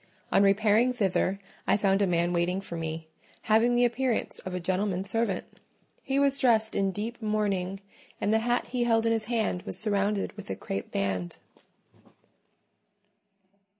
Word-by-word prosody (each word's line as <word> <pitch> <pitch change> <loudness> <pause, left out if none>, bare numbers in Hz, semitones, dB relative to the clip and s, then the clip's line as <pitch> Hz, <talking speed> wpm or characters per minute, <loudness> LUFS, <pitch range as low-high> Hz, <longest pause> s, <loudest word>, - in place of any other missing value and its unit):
On - - +5
repairing 215 +5 +4
thither, 195 -4 +1 0.3
I - - +4
found 195 -1 +2
a 200 - +3
man 175 0 +1
waiting 175 +2 +1
for 195 -3 -7
me, 160 -1 -4 0.4
having 225 +3 +3
the 245 0 +4
appearance 245 0 -1
of 185 -1 -6
a - - -1
gentleman's 190 +2 -1
servant: 225 -5 0 0.6
he 270 0 -1
was 280 0 +3
dressed 225 -4 +3
in 195 -1 +1
deep 220 +5 -5
mourning, 200 -3 -1 0.4
and 210 - +1
the 220 - +4
hat 240 +2 0
he 245 -1 0
held 225 -1 +2
in 230 - +3
his 225 -1 0
hand 220 -5 -1
was - - -6
surrounded 205 -1 0
with 205 - -10
a 95 - -2
crape 95 +1 -5
band. 95 -3 -2
205 Hz, 160 wpm, -28 LUFS, 185-230 Hz, 0.6 s, On